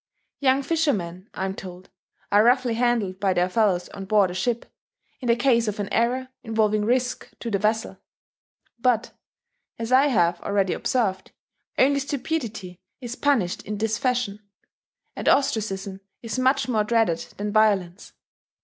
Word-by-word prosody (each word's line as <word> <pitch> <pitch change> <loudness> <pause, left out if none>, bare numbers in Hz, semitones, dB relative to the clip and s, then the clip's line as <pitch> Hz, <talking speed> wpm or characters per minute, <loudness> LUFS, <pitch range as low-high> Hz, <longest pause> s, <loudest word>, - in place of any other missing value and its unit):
Young 270 0 +3
fishermen, 220 - -1
I 190 - -2
am 190 - -2
told, 185 -1 -10 0.4
are 205 +1 +6
roughly 245 0 +3
handled 225 -5 0
by 195 -2 +2
their 180 0 +2
fellows 185 -3 +1
on 195 - -8
board 200 -2 +3
a - - -6
ship, 230 +6 -1 0.5
in 255 - -5
the 235 - +4
case 235 -2 +2
of 210 0 -3
any 200 - -3
error 255 +3 0
involving 215 -2 +1
risk 250 +2 0
to 230 - -5
the 200 - +1
vessel. 215 +2 -1 0.8
But, 245 -1 +1 0.7
as 230 +1 -5
I 265 +3 +6
have 175 -9 +2
already 200 -2 0
observed, 200 -8 -1 0.4
only 280 +1 +4
stupidity 250 - -4 0.2
is 245 -2 -6
punished 250 -13 +1
in 210 0 -5
this 220 +1 -1
fashion; 245 -5 -1 0.8
and - - 0
ostracism 195 -7 0 0.2
is 230 +2 -3
much 260 +2 +2
more 220 -4 +1
dreaded 220 -6 +1 0.2
than 205 +1 -3
violence. 205 -3 +1
220 Hz, 150 wpm, -24 LUFS, 195-250 Hz, 0.8 s, are